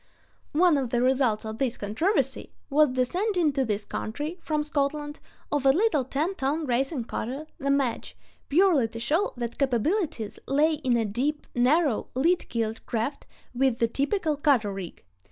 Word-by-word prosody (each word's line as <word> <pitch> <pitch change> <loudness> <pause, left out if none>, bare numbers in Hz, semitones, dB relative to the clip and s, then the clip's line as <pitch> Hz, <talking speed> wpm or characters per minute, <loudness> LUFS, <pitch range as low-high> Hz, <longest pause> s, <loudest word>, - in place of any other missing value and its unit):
One 325 -1 +4
of 260 -3 -2
the 240 - +1
results 255 -5 +2
of 220 +1 -6
this 255 -3 0
controversy 265 - -1 0.2
was 295 -2 +4
the 255 0 +2
sending 355 - 0
to 270 -1 +1
this 210 -3 -2
country, 295 +10 -4
from 305 -1 -1
Scotland, 295 0 -2 0.3
of 290 -2 0
a 270 - +5
little 345 -3 +2
ten 300 +8 -1
ton 300 0 -1
racing 265 +1 0
cutter, 260 +6 -4
the 275 -1 -2
Madge, 275 -4 0 0.3
purely 315 -6 +4
to 230 +1 -8
show 320 - +1
what 235 -1 -5
capabilities 275 - 0
lay 300 +4 +3
in 255 -5 +1
"a 225 - +1
deep, 270 +9 -2
narrow, 265 +1 +2
lead 335 +7 +1
keeled 225 -1 -2
craft 235 +5 -3 0.3
with 255 -1 +2
the 230 - +2
typical 300 - 0
cutter 255 -9 +2
rig." 190 -3 -8
275 Hz, 165 wpm, -26 LUFS, 240-305 Hz, 0.3 s, a